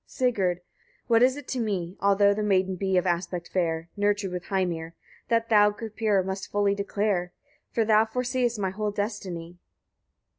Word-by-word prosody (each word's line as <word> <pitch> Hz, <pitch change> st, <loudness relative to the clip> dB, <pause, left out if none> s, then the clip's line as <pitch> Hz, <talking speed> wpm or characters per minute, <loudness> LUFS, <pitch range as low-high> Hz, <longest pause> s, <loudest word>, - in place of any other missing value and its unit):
Sigurd. 195 Hz, -9 st, 0 dB, 0.4 s
28. -, -, -39 dB
What 230 Hz, -1 st, +5 dB
is 255 Hz, +2 st, +4 dB
it 290 Hz, -, -9 dB
to 260 Hz, -, -2 dB
me, 190 Hz, -6 st, -2 dB
although 200 Hz, 0 st, +4 dB
the 210 Hz, -, -3 dB
maiden 190 Hz, -2 st, +1 dB
be 190 Hz, 0 st, 0 dB
of 180 Hz, -, +2 dB
aspect 175 Hz, 0 st, -2 dB
fair? 165 Hz, -2 st, -1 dB
nurtured 205 Hz, -1 st, 0 dB
with 180 Hz, -1 st, -5 dB
Heimir? 170 Hz, -4 st, -2 dB, 0.3 s
That 230 Hz, -1 st, +1 dB
thou, 210 Hz, -2 st, +6 dB
Gripir! 215 Hz, -2 st, -1 dB
must 190 Hz, 0 st, -4 dB
fully 205 Hz, -1 st, +2 dB
declare; 200 Hz, -3 st, -1 dB, 0.4 s
for 225 Hz, -, 0 dB
thou 215 Hz, 0 st, +5 dB
foreseest 245 Hz, 0 st, -1 dB
my 190 Hz, -2 st, -1 dB
whole 210 Hz, +2 st, -2 dB
destiny. 185 Hz, -5 st, -5 dB
200 Hz, 170 wpm, -26 LUFS, 180-215 Hz, 0.4 s, thou